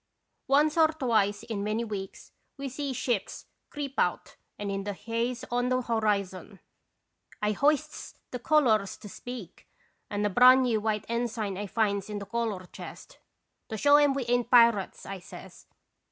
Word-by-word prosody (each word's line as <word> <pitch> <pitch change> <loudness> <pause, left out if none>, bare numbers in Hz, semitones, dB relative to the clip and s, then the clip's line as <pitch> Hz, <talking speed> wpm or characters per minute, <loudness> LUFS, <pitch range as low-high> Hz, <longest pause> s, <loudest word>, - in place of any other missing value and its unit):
Once 295 +4 +3
or 320 - +7
twice 225 -10 0
in 220 -3 -4
many 215 +3 -1
weeks 200 -4 -7 0.3
we 275 0 -4
see 275 +2 -4
ships 245 -4 -2 0.2
creep 280 -2 -5
out - - -1 0.2
and 205 -1 -4
in 195 0 -3
the 205 0 -3
haze 235 +4 -3
on 245 +1 +1
the 255 0 +1
horizon. 205 -5 -1 0.8
I 210 0 +1
hoists 285 +6 0 0.2
the 250 - -4
colors 230 -8 +2
'To - - -11
Speak 235 -2 -9 0.2
' - - -45
and 205 0 -1
a - - +2
brand 255 +5 +7
new 230 -4 +1
white 215 -1 -1
ensign 230 -4 -2
I 205 +2 -4
finds 200 -1 0
in 210 - -4
the 200 - -6
color 220 -4 -3
chest. - - -11 0.5
"'To 220 - -4
show 285 +6 +6
'em 290 -2 +4
we 270 -3 -2
ain't 240 0 +1
pirates,' 235 -5 +4
I 195 -1 -6
says. 175 - -13
230 Hz, 170 wpm, -28 LUFS, 205-255 Hz, 0.8 s, or